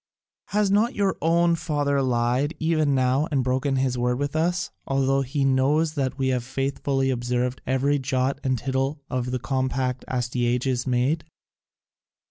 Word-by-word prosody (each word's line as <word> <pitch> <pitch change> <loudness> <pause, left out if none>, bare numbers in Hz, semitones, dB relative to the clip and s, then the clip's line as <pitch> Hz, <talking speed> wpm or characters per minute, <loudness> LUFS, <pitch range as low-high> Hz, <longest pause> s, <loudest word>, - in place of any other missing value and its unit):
Has 205 -1 +1
not 215 +4 +2
your 200 -2 +1
own 170 +2 +3
father 145 -4 0
lied 125 +4 +1
even 155 -3 +1
now 130 +3 +2
and 135 -4 +1
broken 130 +2 0
his 130 -2 0
word 125 0 +1
with 145 +2 -3
us, 175 +3 0 0.2
although 135 0 +2
he 135 +1 -1
knew 135 +4 +3
that 140 -5 -2
we 135 -1 0
had 125 -1 +1
faithfully 135 +1 -1
observed 125 +1 -1
every 140 +2 +1
jot 135 0 -1
and 130 -2 +1
tittle 135 +3 -2
of 125 -1 -1
the 125 - -1
compact 130 0 -1
Astyages 125 +1 -1
made?" 130 +6 +1
135 Hz, 150 wpm, -24 LUFS, 125-145 Hz, 0.2 s, own